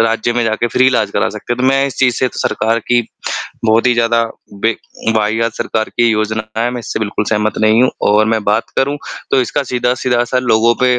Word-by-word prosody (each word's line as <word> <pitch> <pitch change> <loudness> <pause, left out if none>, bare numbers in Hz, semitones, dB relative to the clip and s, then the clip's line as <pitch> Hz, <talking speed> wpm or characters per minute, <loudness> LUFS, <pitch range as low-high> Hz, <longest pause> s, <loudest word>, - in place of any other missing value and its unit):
राज्य 115 +1 +1
में 120 0 0
जाके 110 +1 0
फ़्री 130 +3 +3
इलाज 130 - +2
करा - - 0
सकते - - -5
हैं। 120 - -3
तो 130 - +1
मैं 135 0 +3
इस 135 - -6
चीज़ 125 -3 +3
से 130 - +1
सरकार 115 +1 0
की 120 0 +4 0.6
बहुत 110 +2 +3
ही 125 - +4
ज़्यादा 115 0 +2 0.4
बे 115 0 +2 0.4
वाहियात 110 +2 0
सरकार 110 -1 -2
की 120 -1 +4
योजना 110 0 -1 0.2
है, 120 - 0
मैं 125 - -4
इससे 115 - -4
बिल्कुल 105 0 -1
सहमत 105 -1 0
नहीं 110 +2 +4
हूँ 130 - +3 0.2
और 105 +1 +4
मैं 110 -1 0
बात 105 +3 0
करूँ, 140 +2 +1 0.3
तो 130 - +3
इसका 140 +4 -1
सीधा-सीधा 125 0 +1
असर 125 +1 0
लोगों 115 -1 +3
पे 125 -1 +3
115 Hz, 220 wpm, -15 LUFS, 110-125 Hz, 0.6 s, की